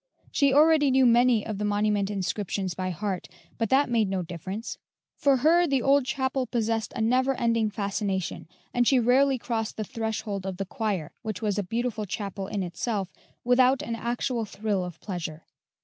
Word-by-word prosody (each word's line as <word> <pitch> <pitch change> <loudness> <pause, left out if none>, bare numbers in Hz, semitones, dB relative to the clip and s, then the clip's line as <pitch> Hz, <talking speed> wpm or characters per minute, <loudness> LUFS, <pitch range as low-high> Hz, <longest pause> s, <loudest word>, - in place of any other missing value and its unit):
She 280 -1 +3
already 300 0 +5
knew 260 0 +4
many 240 -2 +4
of 215 -3 -4
the - - -2
monument 205 -1 +1
inscriptions 195 -1 -2
by 185 +1 -3
heart, 185 +1 -3 0.3
but 225 -2 0
that 275 +2 +4
made 230 -4 +1
no 190 -2 -1
difference; 185 +6 -6 0.4
for 280 -2 +3
her 335 +6 +4
the 270 -4 +1
old 275 -1 +4
chapel 260 -1 -1
possessed 225 -2 -1
a 240 - -2
never 255 +4 +2
ending 230 -2 +1
fascination, 200 -4 -3 0.3
and 245 -1 +2
she 270 - +5
rarely 260 +3 +4
crossed 225 -2 -3
the 215 - -1
threshold 215 -3 -4
of 190 -1 -4
the 195 - -3
choir 190 -6 -3
which 215 -3 -5
was 205 -1 0
a - - 0
beautiful 225 +2 -2
chapel 195 0 -4
in 200 -1 -2
itself 190 +2 -3 0.3
without 255 +2 +4
an 230 - -4
actual 235 +1 -2
thrill 205 -2 -2
of 175 -2 -7
pleasure. 165 -4 -5
220 Hz, 180 wpm, -27 LUFS, 195-250 Hz, 0.4 s, already